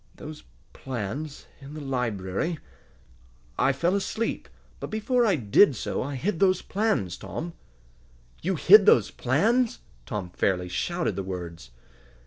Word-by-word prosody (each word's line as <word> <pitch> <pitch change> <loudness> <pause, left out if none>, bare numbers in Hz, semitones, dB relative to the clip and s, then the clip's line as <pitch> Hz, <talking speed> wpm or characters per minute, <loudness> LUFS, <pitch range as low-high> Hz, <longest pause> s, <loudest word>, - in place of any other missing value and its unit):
Those 155 0 -9 0.3
plans 135 +4 -5
in 140 +1 -10
the - - -6
library 125 - -2 1.0
I 135 - +4
fell 170 +7 0
asleep, 210 +3 -2 0.3
but - - -5
before 230 +3 +1
I 195 - +3
did 130 - +4
so - - -3
I 140 +2 -4
hid 165 +6 -2
those 185 -2 +3
plans, 200 - 0
Tom!" 170 +1 -6 0.9
"You 190 +3 0
hid 200 +5 +7
those 115 - +5
plans!" 220 - +1 0.3
Tom 95 -4 -4
fairly 90 -1 0
shouted 170 - -1
the - - -2
words. 85 -7 -7
145 Hz, 130 wpm, -26 LUFS, -, 1.0 s, hid